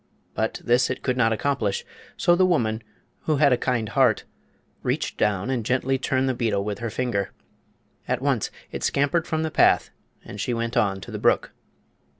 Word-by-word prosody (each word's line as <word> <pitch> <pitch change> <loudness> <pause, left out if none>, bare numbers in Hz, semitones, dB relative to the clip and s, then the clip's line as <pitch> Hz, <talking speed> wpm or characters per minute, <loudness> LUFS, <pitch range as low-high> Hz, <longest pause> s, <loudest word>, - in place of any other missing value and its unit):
But - - -2
this 120 +2 +3
it 130 - -4
could 125 - 0
not 120 -3 +3
accomplish; 110 -4 -1 0.3
so 175 - +4
the 185 - +3
woman, 120 -12 +1 0.4
who 155 - +2
had 140 -2 +4
a - - +5
kind 120 -2 -1
heart, 130 -5 +3 0.6
reached - - -1
down 105 +3 0
and 125 -4 -1
gently 130 +3 0
turned 130 0 0
the 130 - +1
beetle 110 -5 0
with 105 -1 -4
her 115 - -3
finger. 110 -4 -1 0.8
At - - 0
once - - 0 0.2
it - - -5
scampered 145 +4 +1
from 160 0 -1
the 160 - -2
path - - +4 0.3
and 100 - -7
she 120 +5 -1
went 115 +1 -2
on 95 -2 +1
to 95 - -9
the - - -4
brook. - - +2
125 Hz, 185 wpm, -24 LUFS, 110-135 Hz, 0.8 s, a